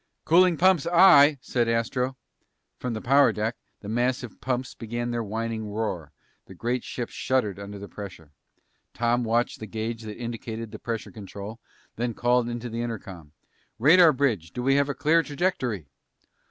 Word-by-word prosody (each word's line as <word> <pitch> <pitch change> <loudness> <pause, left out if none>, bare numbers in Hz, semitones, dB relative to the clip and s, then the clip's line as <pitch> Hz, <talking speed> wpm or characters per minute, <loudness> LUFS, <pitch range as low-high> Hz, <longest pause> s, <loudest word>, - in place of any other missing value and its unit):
"Cooling 175 +1 +5
pumps, 180 -2 +4
aye!" 155 -5 +7
said 120 -3 0
Astro. 125 +3 -1 0.6
From 125 -2 -3
the 110 - -5
power 140 +2 +5
deck, 110 +2 -2 0.3
the 100 - -9
massive 120 +1 -1
pumps 130 0 -2
began 120 +1 -4
their 120 0 -1
whining 110 +1 -3
roar. 110 +1 -3 0.4
The 95 - -12
great 120 +5 -2
ship 120 -2 -5
shuddered 110 -7 -1
under 100 0 -7
the 100 +1 -8
pressure. 95 -8 -10 0.6
Tom 120 +1 +1
watched 115 +1 0
the 110 - -7
gauge 110 +2 -4
that 105 -1 -8
indicated 115 -1 -6
the 110 - -8
pressure 115 -2 -4
control 105 +2 -8 0.4
and - - -7
then 120 -1 0
called 120 0 +2
into 120 0 -4
the 115 0 -4
intercom. 95 -10 -7 0.4
"Radar 160 +7 +7
bridge, 120 - 0
do 125 - -4
we 135 +1 +3
have 140 0 +2
a 140 - -2
clear 165 +2 +3
trajectory?' 140 - -2
120 Hz, 165 wpm, -26 LUFS, 110-130 Hz, 0.6 s, aye